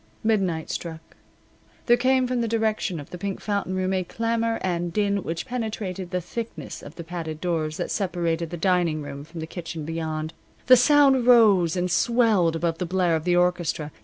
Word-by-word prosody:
Midnight 190 -8 0
struck. 165 -1 -7 0.7
There 240 - +6
came 255 +1 +2
from 250 -1 -1
the 230 - 0
direction 220 -5 -1
of 145 - -11
the 180 - -7
Pink 195 +1 -3
Fountain 200 -3 -2
Room 185 0 0
a 185 -1 0
clamor 230 +3 -1
and 175 -2 -1
din 200 0 0
which 165 0 -4
penetrated 215 -7 -4
the 180 0 -1
thickness 180 - -6
of 145 - -11
the 170 - -7
padded 165 -2 -6
doors 160 -2 -2
that 175 - -3
separated 170 -4 -1
the 175 - -5
dining 175 -4 +1
room 140 0 -7
from 165 +2 -9
the - - -3
kitchen 165 -2 -6
beyond. 160 0 -3 0.3
The 255 - +8
sound 270 -1 +5
rose 205 -9 +6
and 180 0 -1
swelled 220 -8 +3
above 165 0 -1
the 180 - -2
blare 180 -2 +2
of 160 0 -3
the 175 -1 +3
orchestra. 175 -4 0
180 Hz, 190 wpm, -24 LUFS, 165-220 Hz, 0.7 s, The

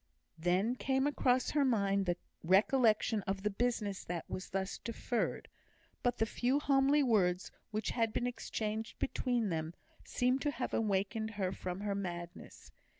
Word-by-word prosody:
Then 180 +7 +2
came 265 +1 +1
across 260 -3 +2
her 295 -1 +3
mind 200 -6 +2
the 175 0 +1 0.3
recollection 215 +4 +4
of 195 0 -2
the 210 - +1
business 210 -3 -1
that 170 -2 -4
was 185 - -5
thus 190 0 -2
deferred; 230 +2 -2 0.5
but 245 -1 +1
the 225 - +2
few 245 +4 +1
homely 280 0 +4
words 190 -7 +2 0.2
which 215 0 -2
had 225 -2 +1
been 240 - -1
exchanged 220 -2 -3
between 240 -5 0
them 160 0 -3 0.3
seemed 255 +2 +1
to 295 - +1
have 265 -3 -3
awakened 215 +1 0
her 190 -2 0
from 185 0 -5
her 205 -1 -1
madness. 175 -3 -6
215 Hz, 150 wpm, -34 LUFS, 190-245 Hz, 0.5 s, recollection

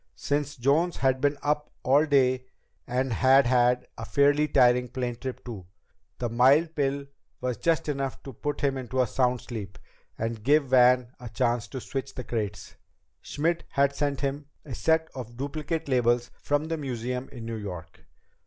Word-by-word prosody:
Since 145 0 -2
Jones 150 +8 +2
had 130 -1 +1
been 145 0 +2
up 150 0 0
all 145 +4 +4
day, 130 -3 +2 0.4
and 125 0 0
had 135 +4 +5
had 125 0 +3
a - - -5
fairly 145 +4 +3
tiring 125 -2 +4
plane 125 -1 -3
trip 130 +2 -7
too, 105 -8 -8 0.5
the 120 - -2
mild 135 +8 +4
pill 140 -1 -1 0.3
was 125 -2 -2
just 165 +3 +1
enough 135 -2 -3
to 135 - -8
put 145 +5 -4
him 135 -2 +1
into 130 +1 -4
a 130 - +4
sound 125 +1 0
sleep 105 -6 -7 0.4
and 115 0 -3
give 145 +1 +3
Van 125 -1 +5
a 120 -1 -8
chance 120 -1 0
to 130 - -6
switch 135 +2 -5
the 130 - -5
crates. 105 -4 -4 0.5
Schmidt 165 +4 -1
had 140 0 +2
sent 145 -2 -1
him 140 +1 -3 0.2
a 135 - -7
set 160 +4 +1
of 120 -2 -8
duplicate 155 +4 -3
labels 120 -2 +2
from 145 +1 0
the 165 0 -2
museum 125 -2 -4
in 120 -3 -8
New 115 -1 -4
York. 90 -4 -8
130 Hz, 170 wpm, -27 LUFS, 120-145 Hz, 0.5 s, had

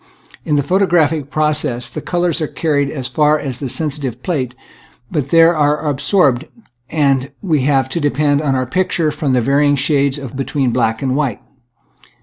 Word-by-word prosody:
In 150 - +1
the 145 - +2
photographic 165 -5 +1
process 150 -6 -1
the - - -6
colors 175 -1 -1
are 155 - 0
carried 145 -3 -1
as 135 -4 -4
far 150 +4 +2
as 135 -4 -4
the 135 - -4
sensitive 140 -4 -2
plate, 130 -8 -2 0.6
but 145 -4 -2
there 165 +1 +6
they 165 - -3
are 150 +1 +1
absorbed, 145 -1 +2 0.4
and 140 -3 +1
we 160 -7 +1
have 135 -2 +2
to 170 - -2
depend 145 -1 +1
for 155 - -3
our 130 -1 +1
picture 170 +2 0
upon 145 -2 -2
the 125 - +3
vary 140 +4 +2
ing 145 - +3
shades 140 0 +1
between 135 0 -2
black 115 0 0
and 130 -1 0
white. 140 -7 -1
145 Hz, 175 wpm, -17 LUFS, 130-155 Hz, 0.6 s, there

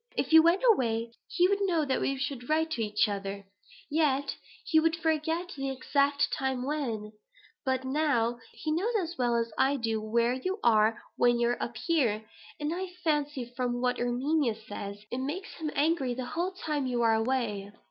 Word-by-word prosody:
If - - 0
you 320 - +10
went 340 +6 +3
away, 230 - +2 0.2
he 355 - +3
would 400 +1 +1
know 340 -6 +2
that 265 - 0
we 275 - 0
should 270 -2 -4
write 320 +1 +2
to 245 - -1
each 210 0 +2
other 200 -1 -4 0.4
yet 285 -2 +1 0.3
he 315 - +4
would 325 +1 +2
forget 325 +2 0
the 275 -1 -3
exact 280 +2 +1
time 265 -2 -1
when; 240 -8 -2 0.5
but 260 -1 0
now 260 -4 +1
he 310 - -4
knows 400 +9 0
as 345 -2 -4
well 240 -1 +2
as 230 -1 -1
I 275 +2 +4
do 225 -4 -1
where 235 +3 +1
you 370 +10 -2
are 220 -1 +4 0.2
when 240 0 +4
you 235 0 +3
are 245 - -1
up 235 -1 -4
here; 240 -11 +1 0.3
and 300 +2 -1
I 375 +2 -3 0.2
fancy, 295 -5 0
from 245 -1 -1
what 250 0 0
Erminia 245 +1 +1
says, 205 -1 -8
it 250 - -2
makes 300 +9 -4
him 315 -1 -2
angry 285 -4 +1
the 255 0 -4
whole 355 +3 -1
time 300 -7 -2
you 240 -2 0
are 225 -1 +4
away." 220 -4 -1
265 Hz, 190 wpm, -29 LUFS, 235-315 Hz, 0.5 s, you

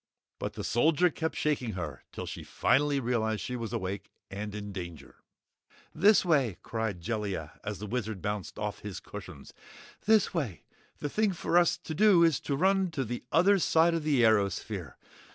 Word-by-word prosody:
But - - -3
the - - -6
Soldier 160 +8 +3
kept 160 +1 -3
shaking 135 -7 0
her 85 -7 -5
till - - -6
she - - -7
finally 145 +1 +2
realized 110 -4 0
she 125 - -4
was 115 -3 -4
awake 95 +1 -4 0.2
and 105 +1 -5
in 105 -1 -5
danger. 85 -4 -8 0.8
"This 200 +5 +5
way!" 135 - +2
cried 110 -6 -3
Jellia, 100 -7 -4
as 105 -1 -4
the 105 - -6
Wizard 110 -2 -3
bounced 105 0 -4
off 105 0 -3
his 100 -3 -6
cushions. 95 -9 -10 0.5
"This 220 -1 +4
way! 135 - -3 0.3
The 145 - -3
thing 210 +3 +1
for 170 - -2
us 175 0 +5
to 160 - -7
do 195 -1 +5
is 165 -4 +3
to 140 - -2
run 190 +4 +2
to 140 -6 -2
the 120 +2 -5
other 190 +5 +5
side 165 0 +4
of 165 - 0
the 145 -5 +2
airosphere. 100 - +1
120 Hz, 175 wpm, -29 LUFS, 100-160 Hz, 0.8 s, This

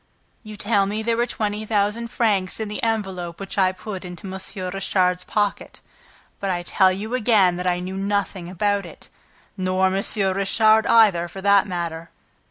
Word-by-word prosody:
"You 215 -2 -10
tell 200 -1 +1
me 215 +2 -3
there 230 +1 +1
were 240 +1 +1
twenty 215 -2 -2
thousand 215 +2 0
francs 205 -6 0
in 220 -1 -3
the 210 - -5
envelope 190 -7 -2
which 195 -1 -6
I 185 -1 +4
put 190 +1 -7
into 180 0 -9
M. 190 - -6 0.4
Richard's 185 -2 0
pocket; 205 -1 -2 0.6
but 195 - -2
I 175 -2 -1
tell 190 +1 +3
you 210 +5 -5
again 210 -7 +3
that 180 0 -3
I 175 -1 +2
knew 185 +1 -5
nothing 195 -3 -2
about 200 +2 0
it... - - -14 0.5
Nor 185 0 +1
M. 195 - 0 0.3
Richard 215 +3 +3
either, 200 -7 +5
for 190 +2 -9
that 200 0 +4
matter!" 170 -2 -4
195 Hz, 175 wpm, -22 LUFS, 185-215 Hz, 0.6 s, either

